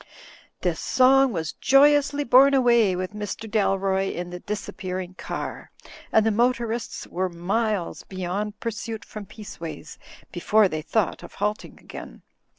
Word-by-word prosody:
This - - -1
song 265 +1 +4
was 160 -5 -3
joyously 285 +1 +4
borne 275 +2 +6
away 235 -7 +4
with 185 +2 -4
Mr. 210 +1 -5
Dal 205 -3 +1
roy 195 0 0
in 175 0 -5
the 180 - -6
disappearing 185 -2 -5
car; - - -6 0.4
and 220 - +4
the 225 - +3
motorists 235 0 -1
were 185 +1 -2
miles 195 +2 -1
beyond 195 +3 -4
pursuit 225 -1 -5
from 210 -2 -9
Peaceways 170 -8 -9 0.3
before 205 +4 +3
they 155 -3 -4
thought 210 +4 -1
of - - -12
halting 210 +1 -3
again. - - -10
210 Hz, 140 wpm, -24 LUFS, 185-235 Hz, 0.4 s, borne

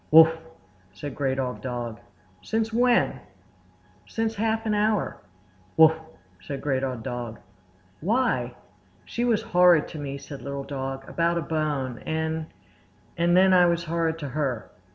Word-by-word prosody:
"Wuff!" 160 +1 +8 0.6
said 145 +4 -6
Great 135 -2 -1
Old 125 -5 -3
Dog. 120 -2 -4 0.4
"Since 225 0 -1
when?" 245 +1 +3 0.9
"Since 225 0 -1
half 225 +1 -1
an 215 - +1
hour." 210 -1 +1 0.6
"Wuff!" 160 0 +7 0.4
said 135 +9 -5
Great 135 -1 -1
Old 130 -4 -3
Dog. 120 -2 -5 0.6
"Why?" 240 - 0 0.5
"She 235 - -3
was 235 -3 +2
horrid 175 -3 +5
to 155 - -7
me," 140 -1 -4
said 140 0 -9
Little 140 0 -4
Dog, 135 -1 -5
"about 170 0 +1
a - - 0
bone; 145 -6 -2
and—and 160 +2 -3
then 190 0 +6
I 180 -1 +6
was 170 0 +1
horrid 165 0 -1
to 145 -4 -5
her." 130 -5 -2
160 Hz, 140 wpm, -26 LUFS, 135-180 Hz, 0.9 s, Wuff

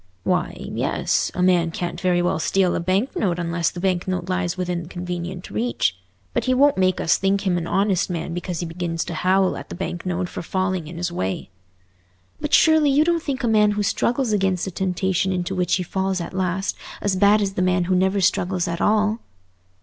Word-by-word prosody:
"Why, - - 0
yes, - - -1
a 180 - 0
man 175 -2 +3
can't 175 +1 -4
very 180 -1 +2
well 175 - 0
steal 185 +2 +2
a - - 0
bank 190 +8 0
note 180 -4 0
unless 170 -1 0
the 175 - -8
bank 180 -1 0
note 180 -1 -2
lies 185 -1 -1
within 175 -2 -3
convenient 180 0 -5
reach; 110 -3 0 0.4
but - - 0
he 255 0 +2
won't 285 +2 +5
make 185 -1 +2
us 165 - +2
think 195 +1 +1
him 185 -2 +2
an 170 -1 -2
honest 195 -1 +1
man 170 -1 -3
because 175 0 -4
he - - -2
begins 165 0 -3
to - - -5
howl 185 +3 +2
at - - -8
the - - -6
bank 175 -1 -4
note 180 0 -2
for - - -6
falling 185 -2 -2
in 165 +2 -8
his 175 0 -2
way." 95 - -3 0.9
"But 295 0 -3
surely 315 -2 +5
you 280 +2 +4
don't 340 0 +1
think 275 -4 -3
a - - +2
man 210 -2 +4
who 205 0 -1
struggles 240 +4 0
against 190 -3 +1
a 190 - -4
temptation 190 +1 0
into 180 0 -2
which 180 -1 +1
he 185 - -1
falls 190 +1 -1
at 170 +1 -6
last 185 +1 -1 0.2
as 200 -2 0
bad 205 +2 +5
as 195 -2 -1
the 185 - -1
man 180 0 +2
who 185 +2 0
never 190 +2 +2
struggles 180 0 +1
at 170 0 -3
all?" 215 +1 +2
185 Hz, 215 wpm, -22 LUFS, 175-195 Hz, 0.9 s, won't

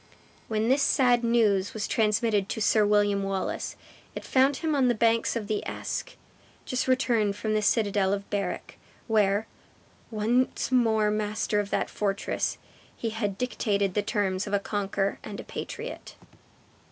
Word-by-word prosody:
When 220 0 0
this 265 +3 +3
sad 245 -3 +3
news 215 -5 +2
was 215 -1 -2
transmitted 215 -2 +1
to - - -3
Sir 215 -1 +3
William 205 -1 +3
Wallace, 195 -1 -3 0.4
it - - -6
found 270 +2 +3
him 315 +3 -1
on 270 -3 +3
the 240 - +2
banks 230 +2 +2
of 230 -3 -2
the 210 0 -2
Eske, - - -5 0.5
just 255 0 -1
returned 235 -6 +2
from 215 +1 -2
the 215 - +2
citadel 205 -2 +2
of 200 0 -2
Berwick, 205 -1 -3 0.3
where, 210 -1 +2 0.6
once 235 +5 0
more 220 -4 +3
master 210 0 -1
of 205 -1 -2
that - - 0
fortress, 200 -1 -2 0.4
he 230 - -3
had 205 -3 -2
dictated 200 -5 0
the 210 - +1
terms 200 -1 -1
of 200 - -5
a 200 - +3
conqueror 200 -1 -2
and 205 - -7
a - - -6
patriot. - - -7
215 Hz, 155 wpm, -27 LUFS, 200-230 Hz, 0.6 s, this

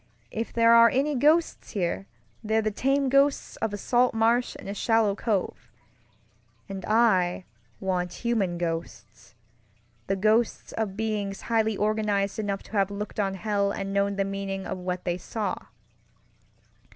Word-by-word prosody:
If 225 +1 -3
there 230 0 +5
are 230 0 +8
any 280 +5 +1
ghosts 305 +5 +2
here, 195 -1 -2 0.4
they're 220 +1 +1
the 215 - 0
tame 270 +5 +1
ghosts 275 +2 +2
of 225 - -2
a 205 - -4
salt 245 +4 +2
marsh 230 +2 +2
and - - -10
a 200 - -3
shallow 225 0 +2
cove; 200 -2 -2 1.0
and 195 -1 -6
I 190 -6 +2 0.3
want 180 -2 -1
human 200 -7 +1
ghostsŌĆöthe 115 - -7
ghosts 220 +3 +1
of 210 -3 -3
beings 210 -3 -2
highly 220 -2 +1
organized 210 -1 0
enough 200 -2 -2
to - - -17
have 200 -3 +1
looked 205 +1 -5
on 195 -2 0
hell 200 0 0
and 195 0 -4
known 200 0 +1
the 195 0 0
meaning 195 -1 -4
of 185 - -4
what 180 0 -3
they 175 0 -1
saw. 215 +3 -3
205 Hz, 150 wpm, -26 LUFS, 190-225 Hz, 1.0 s, are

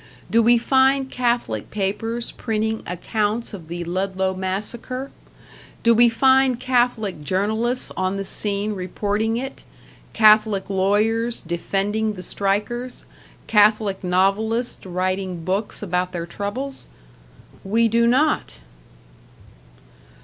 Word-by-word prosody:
Do 230 - +5
we 240 +1 +5
find 265 +2 +2
Catholic 235 - -1
papers 225 +4 -2
printing 220 -1 -2
accounts 210 +6 -2
of 175 -6 -9
the 175 +1 -5
Ludlow 190 +2 -1
massacre? 215 +8 -4 0.7
Do 235 - +6
we 235 +1 +6
find 260 +1 +3
Catholic 240 - 0
journalists 220 - 0
on 185 +1 -1
the 195 - -2
scene 205 +1 -1
reporting 205 +4 -1
it, 265 +2 -6 0.5
Catholic 215 -2 +4
lawyers 215 +5 +1
defending 200 +5 -1
the 185 -2 -8
strikers, 210 +7 -2 0.4
Catholic 210 -2 +3
novelists 200 +6 0
writing 185 -1 -2
books 200 +3 -2
about 180 -1 -1
their 170 -1 -3
troubles? 220 +10 -5 0.8
We 225 +4 +2
do 235 +1 +3
not! 285 +6 +2
215 Hz, 105 wpm, -22 LUFS, 190-235 Hz, 0.8 s, Do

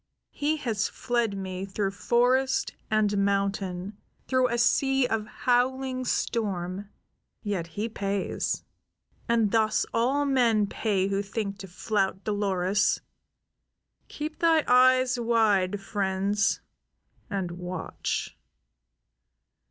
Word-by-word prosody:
He 300 +2 0
has 225 -7 -1
fled 235 -5 -1
me 190 -1 -4
through 195 0 -2
forest 255 +5 +1 0.2
and 210 -2 +2
mountain; 195 -1 -1 0.3
through 255 -1 +3
a 240 - -1
sea 270 +2 +3
of 225 -3 -1
howling 255 +2 0
storm; 195 -5 -2 0.5
yet 195 -6 -2
he 205 +7 -3
pays. 200 -3 -2 0.7
And 225 -3 +3
thus 220 0 +2
all 265 +5 +2
men 240 -6 +3
pay 200 -2 0
who 200 0 0
think 200 0 -4
to 195 - -7
flout 195 +1 -1
Dolores. 205 -1 +1 1.1
Keep 305 +1 -6
thy 325 -2 +4
eyes 255 0 +5
wide, 210 -5 +2
friends, 200 0 0 0.7
and 190 -3 -2
watch." 180 0 -4
210 Hz, 105 wpm, -27 LUFS, 195-245 Hz, 1.1 s, eyes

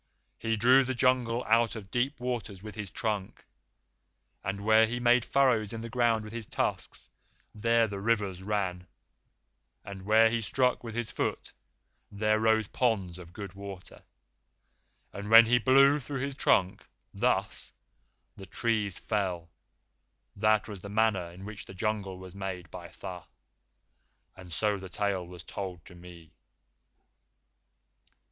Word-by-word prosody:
He 115 0 -1
drew 130 +5 +6
the 130 0 -3
Jungle 125 -1 +2
out 115 +1 +3
of 100 -3 -9
deep 130 +3 -1
waters 120 -6 -4
with 110 -1 -8
his 105 -1 -6
trunk; 105 -3 -3 1.0
and 100 +1 -4
where 110 0 +6
he 120 +2 -3
made 120 0 +4
furrows 120 -7 +2
in 115 - -5
the 115 0 -7
ground 115 -2 +2
with 105 +1 -9
his 115 -2 -5
tusks, - - -3 0.4
there 115 +2 +3
the 100 -2 -5
rivers 100 -4 0
ran; 95 -3 -2 1.0
and 100 -1 -8
where 110 +3 +5
he 115 0 0
struck 125 +4 +1
with 115 -2 -7
his 120 -1 -3
foot, - - -3 0.6
there 110 +1 +1
rose 110 -1 +3
ponds 100 -8 -1
of 85 -1 -11
good 100 -1 -8
water; 100 -1 -10 1.1
and 100 +1 -6
when 115 +1 +10
he 120 +2 +3
blew 135 +4 +5
through 140 -1 -5
his 140 +1 -2
trunk, 95 -8 +2 0.3
thus, - - -1 0.6
the 95 - -11
trees 110 -5 -1
fell. 90 -6 -2 0.8
That 110 +1 +2
was 100 -4 -8
the 100 - -8
manner 105 -4 +1
in 90 +3 -11
which 105 -1 -7
the 95 - -11
Jungle 100 -2 -2
was 95 -1 -10
made 95 -4 -6
by 90 -1 -8
Tha; 90 0 -9 1.1
and 90 -2 -12
so 105 +3 0
the 95 0 -9
tale 95 -2 -2
was 90 0 -11
told 90 -4 -6
to - - -13
me." 85 -2 -13
105 Hz, 150 wpm, -29 LUFS, 95-115 Hz, 1.1 s, when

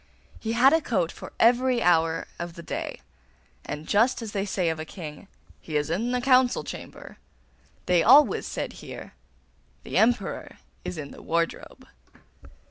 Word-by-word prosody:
He 225 0 -3
had 260 +5 +5
a 325 - +4
coat 185 - 0
for - - -10
every 245 +1 +4
hour 165 -2 +2
of 170 -1 -6
the 170 - -9
day; - - -5 0.6
and 150 +1 -6
just 230 +5 +3
as 220 - -6
they 200 -1 -2
say 185 -3 0
of 160 -1 -3
a - - -3
king, 155 +2 -9 0.3
'He 155 -2 -3
is 150 +2 -1
in 220 +8 -1
the 250 0 0
council 255 -1 +3
chamber,' - - -9 0.7
they 180 -2 +3
always 275 - +5
said - - -4
here, - - -10 0.7
'The - - 0
Emperor 235 +2 0 0.3
is 180 - -5
in 145 -2 -6
the - - -12
wardrobe. 165 0 -3
195 Hz, 160 wpm, -26 LUFS, 165-245 Hz, 0.7 s, had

